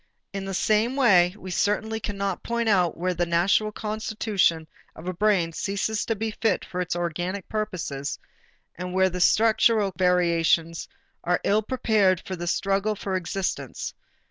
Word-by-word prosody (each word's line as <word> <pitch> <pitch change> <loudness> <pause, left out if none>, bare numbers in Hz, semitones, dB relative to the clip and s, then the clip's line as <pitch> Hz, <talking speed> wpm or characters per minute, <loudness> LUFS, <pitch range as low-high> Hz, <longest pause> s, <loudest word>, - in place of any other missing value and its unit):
In 195 -1 -4
the 195 - -4
same 215 +6 +2
way, 190 -9 +4
we 185 -2 -8
certainly 220 +4 0
cannot 200 -3 -3
point 235 0 -2
out 180 -6 +2
where 180 +2 -1
the 175 0 -1
natural 180 +5 +2
constitution 210 -6 -1 0.3
of 160 - -11
a 185 - -1
brain 180 -3 +1
ceases 205 +4 -2
to 225 - 0
be 220 +1 -3
fit 215 -2 0
for 180 - -4
its 175 -1 -2
organic 175 +3 -3
purposes 165 -10 -3 0.6
and 180 +1 -6
where 190 0 +3
the 180 +1 -4
structural 220 0 +3
variations 170 -2 +2 0.4
are 175 0 +1
ill 210 +2 +3
prepared 215 -6 +2
for 190 - -4
the 175 0 -6
struggle 195 +4 0
for 195 -1 -3
existence. 185 +1 -3
195 Hz, 155 wpm, -25 LUFS, 175-215 Hz, 0.6 s, way